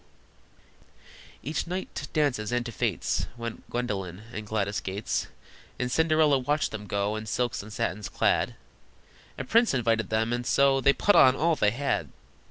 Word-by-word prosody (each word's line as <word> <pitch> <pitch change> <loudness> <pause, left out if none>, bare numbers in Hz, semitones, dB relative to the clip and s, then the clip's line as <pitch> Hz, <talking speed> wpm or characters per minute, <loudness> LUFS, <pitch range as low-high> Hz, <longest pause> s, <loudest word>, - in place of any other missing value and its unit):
Each 150 +7 -2
night 185 +2 -4
to - - -5
dances 135 -8 0
and 120 0 0
to 120 - -5
fêtes - - -1
Went 115 -1 -7
Gwendolyn 100 -6 -3
and 110 -1 -6
Gladys 100 -3 -1
Gates, 95 +4 -3 0.5
And 125 0 -2
Cinderella 155 -3 +3
watched 145 +4 0
them 105 -1 -6
go 100 +1 -1
In 110 0 -5
silks 120 +2 -1
and 105 +2 -11
satins 105 0 -3
clad: - - +1 0.8
A - - -3
prince 230 - +3
invited 115 -4 +1
them, 110 +2 0
and 120 0 -1
so 135 +2 +3
They 140 - +6
put 205 - +3
on 130 0 +7
all 165 +2 +2
they 105 - +3
had! 120 - -1
120 Hz, 165 wpm, -27 LUFS, 105-140 Hz, 0.8 s, on